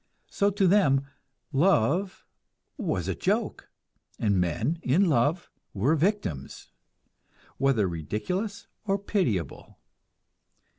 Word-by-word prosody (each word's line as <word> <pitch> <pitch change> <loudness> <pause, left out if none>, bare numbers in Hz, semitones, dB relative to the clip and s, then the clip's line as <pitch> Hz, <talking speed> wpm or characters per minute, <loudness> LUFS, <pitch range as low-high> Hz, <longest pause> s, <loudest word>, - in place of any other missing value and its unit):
So 200 - +2
to 200 -1 +1
them 160 -8 +4 0.5
"love" 170 - +2 0.5
was - - -2
a - - 0
joke, - - -2 0.5
and 100 -4 +1
men 120 - -1
"in 170 +9 +3
love" 150 +4 +1 0.2
were 125 +11 +2
victims, 155 - -2 0.9
whether 130 -7 +2
ridiculous 145 - -3 0.2
or 200 -2 0
pitiable. 170 - -2
145 Hz, 95 wpm, -27 LUFS, -, 0.9 s, them